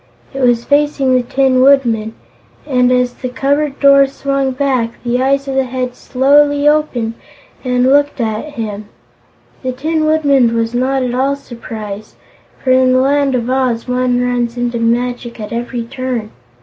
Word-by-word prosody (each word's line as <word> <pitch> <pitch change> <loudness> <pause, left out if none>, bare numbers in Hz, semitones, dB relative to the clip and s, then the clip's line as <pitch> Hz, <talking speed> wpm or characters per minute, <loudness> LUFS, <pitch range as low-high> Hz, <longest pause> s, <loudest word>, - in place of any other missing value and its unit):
It 270 - -4
was 240 -2 +2
facing 285 -2 +1
the 255 - +3
Tin 255 +1 +1
Woodman 235 -5 +2 0.5
and 250 -3 +2
as 250 -1 +1
the 255 - -6
cupboard 280 +3 -1
door 275 -1 +6
swung 275 0 -2
back, 255 -3 -1
the 245 +1 0
eyes 275 +1 +1
of 270 - -3
the 265 0 +1
Head 250 0 -4
slowly 285 +2 +2
opened 295 -7 +1 0.5
and 250 -1 0
looked 285 +2 +2
at 225 +6 -3
him. 215 -2 -5 0.7
The 255 -1 -3
Tin 310 +4 -1
Woodman 280 -6 +2
was 230 0 -1
not 260 +2 0
at 245 -1 -2
all 270 +2 0
surprised, 220 -5 -9 0.5
for 260 - +1
in 255 0 +4
the 255 - +3
Land 275 0 +1
of 240 -1 -2
Oz 255 -2 -1
one 250 0 0
runs 245 -1 -1
into 240 -1 -2
magic 240 +1 -2
at 210 +1 -6
every 235 0 -3
turn. 250 -3 -4
255 Hz, 160 wpm, -15 LUFS, 240-275 Hz, 0.7 s, door